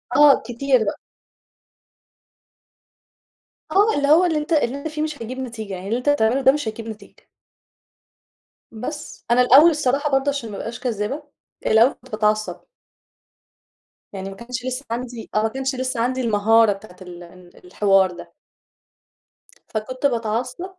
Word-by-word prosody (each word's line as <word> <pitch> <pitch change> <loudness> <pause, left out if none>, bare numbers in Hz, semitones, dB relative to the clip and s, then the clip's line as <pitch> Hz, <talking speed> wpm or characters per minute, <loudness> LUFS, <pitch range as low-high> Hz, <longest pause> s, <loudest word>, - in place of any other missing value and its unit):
آه، 290 -2 +6
كتير 255 0 +1
بقى. - - -3 2.7
آه، 415 +3 +3
اللي 285 0 +1
هو 320 +5 +6
اللي 325 -3 +1
أنت 300 +2 -2
اللي 270 -4 +1
أنت 280 - -5
فيه 305 0 -5
مش 305 -4 -4
هيجيب 255 +3 -6
نتيجة، 225 -6 -6
يعني 185 +1 -7
اللي 230 - 0
أنت 250 +4 -1
تعمله 265 -1 +2
ده 265 - +6
مش 290 -4 -3
هيجيب 225 +1 -6
نتيجة. 220 -1 -12 1.4
بس، 295 +7 -7
أنا 250 +1 +5
الأول 275 +7 +7
الصراحة 290 -1 0
برضه 270 +1 +2
عشان 275 -6 -4
ما 200 - -6
أبقاش 235 +1 -6
كذابة، 245 +5 -3 0.4
الأول 225 +5 +5
كنت 255 +1 -21
باتعصب 215 0 0 1.5
يعني 195 0 -6
ما 195 - -9
كانش 240 +3 -7
لسه 255 +2 -4
عندي 240 -1 -5
آه، 215 - +2
ما - - +3
كانش 265 +2 -3
لسه 255 -1 -3
عندي 255 +2 0
المهارة 225 -1 +4
بتاعة 195 -2 -14
ال 175 -1 -10
ال 175 +1 -17
الحوار 195 0 +3
ده. 175 -1 -12 1.3
فكنت 255 +5 -4
باتعصب 240 +5 -1
245 Hz, 150 wpm, -21 LUFS, 215-275 Hz, 2.7 s, الأول